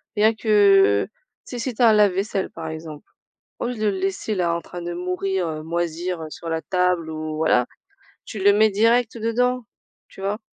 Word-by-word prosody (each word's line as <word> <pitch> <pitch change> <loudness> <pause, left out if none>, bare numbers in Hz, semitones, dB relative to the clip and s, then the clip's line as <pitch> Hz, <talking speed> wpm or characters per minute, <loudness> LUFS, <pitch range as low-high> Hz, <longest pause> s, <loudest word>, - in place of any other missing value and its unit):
Bien 215 +2 +4
que, 200 - +4
heu, - - -34 0.4
si 245 - -7
si 250 +2 -3
tu - - -4
as 235 - +7
un - - +5
lave-vaisselle, 200 -1 +1
par 165 -1 -8
exemple, 155 -2 -8 0.5
au - - -2
lieu 245 - -3
de 215 0 -1
le 200 -2 0
laisser 195 +3 -2
là, 175 -3 0
en 170 - -2
train 175 - -9
de 175 0 -4
mourir, 180 +1 -2
heu, 155 -1 -5
moisir, 170 +1 -3
heu, 155 - -7
sur 165 - -8
la 160 0 -2
table 180 -3 0
ou 155 0 -5
voilà, 155 -6 +2 0.6
tu 215 - -7
le 200 +1 +6
mets 215 +1 +4
direct 230 +3 +2
dedans, 245 +2 0 0.4
tu - - -14
vois? 200 +2 -2
190 Hz, 205 wpm, -22 LUFS, 165-215 Hz, 0.6 s, as